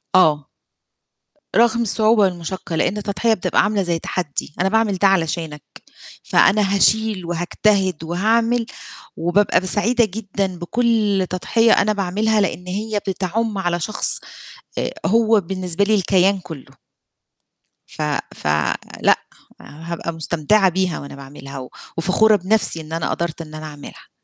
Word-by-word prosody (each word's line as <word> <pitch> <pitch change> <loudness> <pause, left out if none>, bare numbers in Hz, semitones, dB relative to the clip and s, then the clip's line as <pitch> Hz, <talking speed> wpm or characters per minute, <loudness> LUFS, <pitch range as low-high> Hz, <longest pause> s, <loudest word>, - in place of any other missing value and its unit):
آه. 155 -6 +4 1.1
رغم 235 0 +4
الصعوبة 220 0 +2
والمشقَّة، 175 -2 -3
لأن 185 +5 0
التضحية 210 +2 0
بتبقى 195 - +1
عاملة 205 -1 0
زي 170 -2 -1
تحدّي، 155 -4 -3
أنا 190 - +2
باعمل 220 -1 +2
ده 195 - +4
علشانك، 165 -5 -1 0.6
فأنا 200 -1 +3
هاشيل 215 -2 +2
وهاجتهد 175 +1 0
وهاعمل 225 +7 +1 0.5
وبابقى 180 +5 +2
ب - - -6
سعيدة 225 +6 +2
جدًا 200 -1 -3
بكُلّ 210 +1 +1
تضحية 225 +5 +2
أنا 215 +1 +2
باعملها 210 +3 0
لأن 180 -2 -2
هي 210 +3 -2
بتعُمّ 200 +4 -2
على 175 -2 -1
شخص 215 +6 +1 0.6
آآ، - - -1
هو 225 +1 +4
بالنسبة 185 0 -1
لي 215 +2 +3
الكيان 195 0 +2
كُلّه. 160 -6 -11 1.1
ف - - -9 0.3
ف - - -6 0.5
لأ، - - +4 0.4
هابقى 165 +2 -6
مستمتعة 170 +5 +2
بيها 185 -1 -1
وأنا 140 - -9
باعملها 135 0 -9
و 130 - -9 0.3
وفخورة 205 +5 +4
بنفسي 200 -3 +1
إن 155 0 -10
أنا 165 0 -2
قدرت 170 -1 -3
إن 155 -1 -10
أنا 155 0 -7
أعملها. 145 -1 -11
190 Hz, 135 wpm, -20 LUFS, 170-215 Hz, 1.1 s, آه